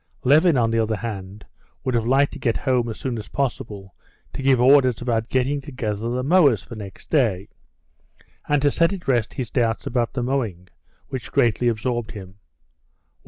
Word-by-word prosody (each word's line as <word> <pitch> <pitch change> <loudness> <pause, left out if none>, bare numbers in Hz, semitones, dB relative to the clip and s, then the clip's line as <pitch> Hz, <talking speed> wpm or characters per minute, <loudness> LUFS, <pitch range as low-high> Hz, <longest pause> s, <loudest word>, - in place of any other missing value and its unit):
Levin, 150 +4 +5
on 115 -2 +2
the 115 - +1
other 110 0 0
hand, 105 -2 -7 0.4
would 130 -2 -1
have 115 -1 0
liked 135 +3 +3
to - - -8
get 115 -3 0
home 125 -3 0
as 110 - -7
soon 125 -4 -3
as 105 - -9
possible 105 -8 -4 0.4
to - - -5
give 135 -2 +3
orders 130 -2 +5
about 115 -2 -1
getting 135 +3 0
together 115 -6 -4
the 125 +1 -2
mowers 140 - +4
for - - -11
next 100 -4 -10
day, 110 - +1 1.0
and 145 -1 +2
to 145 - +4
set 165 +4 +2
at 190 -3 -6
rest 120 -5 +1
his 125 -4 -4
doubts 115 -3 0
about 120 -1 -1
the 125 -2 -2
mowing, 115 -9 -2 0.4
which 130 -3 -6
greatly 120 -3 +2
absorbed 120 0 -1
him. 100 -1 -11
120 Hz, 180 wpm, -22 LUFS, 110-135 Hz, 1.0 s, Levin